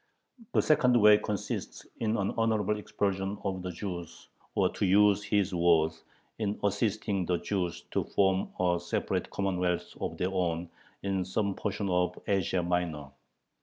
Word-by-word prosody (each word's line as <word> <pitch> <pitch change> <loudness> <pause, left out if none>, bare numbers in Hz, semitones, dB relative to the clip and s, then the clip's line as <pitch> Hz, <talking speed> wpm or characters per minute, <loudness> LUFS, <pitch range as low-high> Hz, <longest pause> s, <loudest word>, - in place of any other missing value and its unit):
The - - +3
second 125 -5 +4
way 105 -1 +7
consists 105 -3 -4
in 110 0 0
an 100 -1 0
honorable 110 -2 +1
expulsion 100 -1 -2
of 95 -2 -2
the 90 - -4
Jews 85 -2 -7 0.3
or, - - +4
to - - -3
use 100 +1 +5
his 100 -2 0
words, 80 -2 +2 0.4
"in 105 -1 -1
assisting 100 -2 0
the 90 - +2
Jews 90 -1 -2
to - - 0
form 95 -1 +1
a 90 -1 +2
separate - - -2
commonwealth 90 -3 -1
of - - -3
their 90 +1 -1
own 85 -2 -1 0.3
in 95 -1 0
some 100 +2 -1
portion 100 0 -3
of 90 -1 +1
Asia 95 -2 +1
Minor." 85 -5 -2
95 Hz, 150 wpm, -30 LUFS, 90-105 Hz, 0.4 s, way